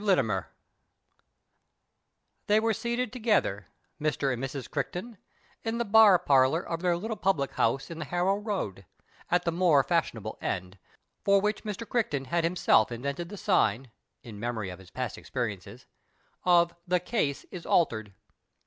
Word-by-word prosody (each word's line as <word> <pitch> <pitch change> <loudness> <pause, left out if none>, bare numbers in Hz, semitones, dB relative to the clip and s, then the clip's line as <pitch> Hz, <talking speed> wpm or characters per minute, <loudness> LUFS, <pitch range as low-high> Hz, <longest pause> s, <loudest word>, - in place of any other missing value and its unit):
LITTIMER 125 - +1 2.0
They 210 +1 +5
were 225 0 +1
seated 235 +2 -2
together, 210 - +1 0.3
Mr. 145 -3 0
and 125 +1 -5
Mrs. 135 -1 -4
Crichton 200 +3 -4 0.4
in 225 0 -2
the 235 - -1
bar 210 -2 +7
parlour 135 +2 +3
of 165 0 -4
their 180 -1 +2
httle 215 +5 -5
pubhc 160 -8 +1
house 135 +5 0
in 165 - -7
the 155 - -4
Harrow 180 +5 +1
Road, 190 - -4 0.4
at 180 - +2
the 170 - +2
more 165 -5 +4
fashionable 115 - -1
end, 90 +1 -4 0.4
for 200 0 +5
which 210 +2 -1
Mr. 215 +2 -5
Criehton 150 - -1
had 170 +2 +1
himself 165 -10 +3
invented 140 +8 -4
the 205 - -8
sign 135 - +1 0.3
(in 110 -5 -10
memory 110 -4 -3
of 90 - -10
his 95 -1 -15
i)ast - - -4
expcricnecs) - - -5 0.6
of 170 -1 +4
" 175 - -44
The 180 0 +2
Case 175 - -1
is 175 -3 -8
Altered." 110 - +1
170 Hz, 155 wpm, -28 LUFS, 130-205 Hz, 2.0 s, bar